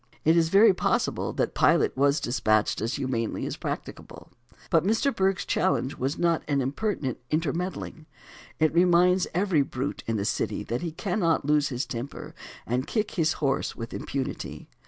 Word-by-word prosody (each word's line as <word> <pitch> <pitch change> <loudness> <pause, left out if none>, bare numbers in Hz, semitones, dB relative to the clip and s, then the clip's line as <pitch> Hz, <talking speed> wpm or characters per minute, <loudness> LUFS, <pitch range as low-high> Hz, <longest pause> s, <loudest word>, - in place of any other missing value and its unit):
It 160 +2 +5
is 165 -1 +3
very 200 +3 +6
possible - - 0
that - - -1
Pilot - - +3
was 140 +2 +3
despatched 110 -5 +1
as 115 +4 -1
humanely 120 -4 -2
as - - -3
practicable. - - -7 0.4
But 165 -2 +4
Mr. 225 +8 +1
Bergh's 190 -1 +1
challenge 175 -7 0
was 135 +4 -2
not 170 -2 +2
an 140 -2 +1
impertinent 135 - -2
intermeddling. 160 +1 -3 0.5
It 155 -1 +2
reminds 180 +1 +4
every 185 -5 +2
brute 135 0 -4
in 115 -1 0
the 100 - -2
city - - -1
that 120 - -3
he 170 -2 -3
cannot 170 -3 0
lose 150 0 +2
his 125 -1 -2
temper 120 +3 -6 0.3
and 125 +3 -1
kick 215 -2 -1
his 160 -2 +1
horse 140 -2 -1
with 115 -1 -7
impunity. 135 -2 -5
155 Hz, 160 wpm, -26 LUFS, 130-180 Hz, 0.5 s, very